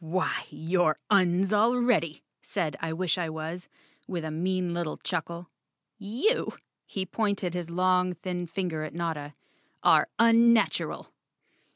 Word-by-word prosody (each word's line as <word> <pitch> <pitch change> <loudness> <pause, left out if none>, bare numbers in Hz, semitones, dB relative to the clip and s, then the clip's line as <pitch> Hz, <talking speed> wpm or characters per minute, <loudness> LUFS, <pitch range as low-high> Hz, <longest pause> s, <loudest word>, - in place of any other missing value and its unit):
"Why, 180 +4 -1
you're 165 -1 +1
Uns 190 0 +3
already," 225 -7 +2 0.2
said 165 -7 -2
I 165 0 -3
wish 180 +2 0
I 170 -2 -1
was, 160 +3 -5 0.4
with 170 -4 -3
a 155 - -3
mean 180 +2 -1
little 170 -2 -3
chuckle. 170 0 -4 0.5
"You," 240 - 0 0.3
he 190 -1 -3
pointed 200 -2 -1
his 175 -2 -4
long 180 +1 +2
thin 180 +1 -4
finger 170 -2 -3
at 155 - -7
Notta, 160 -4 -3 0.5
"are - - +5
unnatural. 230 0 +3
180 Hz, 130 wpm, -28 LUFS, 165-195 Hz, 0.5 s, are